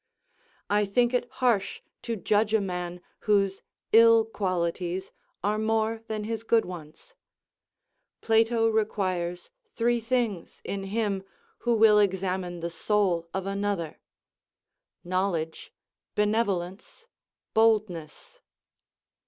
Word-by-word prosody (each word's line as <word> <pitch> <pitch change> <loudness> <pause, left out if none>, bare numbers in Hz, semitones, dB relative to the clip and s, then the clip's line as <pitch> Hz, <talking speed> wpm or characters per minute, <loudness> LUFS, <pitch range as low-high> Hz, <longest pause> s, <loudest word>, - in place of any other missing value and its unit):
I 205 0 +2
think 240 +5 +2
it 245 -1 0 0.2
harsh 205 -5 +1 0.2
to 230 - -3
judge 210 +2 +2
a - - +4
man 180 -2 -4 0.3
whose 195 -2 +2 0.3
ill 230 0 +7
qualities 185 -3 -2 0.3
are 210 +2 +1
more 220 0 0
than 215 -2 -3
his 220 0 -3
good 225 0 +2
ones: 170 - -10 1.1
Plato 225 0 +3
requires 185 -5 -1 0.2
three 240 +1 +2
things 230 -6 -2
in 195 -1 -4
him 200 -1 -1 0.4
who 240 -1 +1
will 215 -1 +6
examine 185 -3 -1
the 170 0 -3
soul 175 -1 0
of 190 0 -3
another: 195 -5 -2 1.0
knowledge, 175 -3 -2 0.4
benevolence, 210 - -1 0.5
boldness. 210 -8 0
205 Hz, 105 wpm, -27 LUFS, 180-225 Hz, 1.1 s, ill